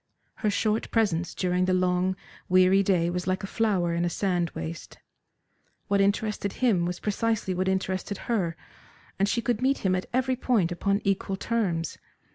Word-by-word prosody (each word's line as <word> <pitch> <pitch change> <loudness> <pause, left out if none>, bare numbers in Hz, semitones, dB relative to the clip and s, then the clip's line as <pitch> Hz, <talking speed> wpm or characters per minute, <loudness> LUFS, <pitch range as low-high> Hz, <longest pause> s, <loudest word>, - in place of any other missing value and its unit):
Her 215 - 0
short 215 +2 0
presence 175 -7 0
during 180 0 +1
the 185 0 +2
long, 185 +1 +1 0.3
weary 185 +1 +5
day 180 -3 +2
was 180 +1 -3
like 190 +2 0
a - - -1
flower 195 -5 0
in 170 0 0
a 175 - +1
sand 175 -2 0
waste. 80 +1 -6 0.9
What 200 0 +3
interested 200 0 0
him 200 -9 +2
was 180 0 -4
precisely 215 -2 -1
what 185 +1 -1
interested 190 +1 -1
her, 180 -9 -1 0.6
and 200 +1 +2
she 235 +1 0
could 240 -1 0
meet 265 -3 +1
him 185 - +3
at 185 0 -2
every 260 +1 +1
point 220 -9 +1
upon 200 +3 0
equal 195 -1 0
terms. 190 -8 -1
190 Hz, 170 wpm, -27 LUFS, 180-215 Hz, 0.9 s, weary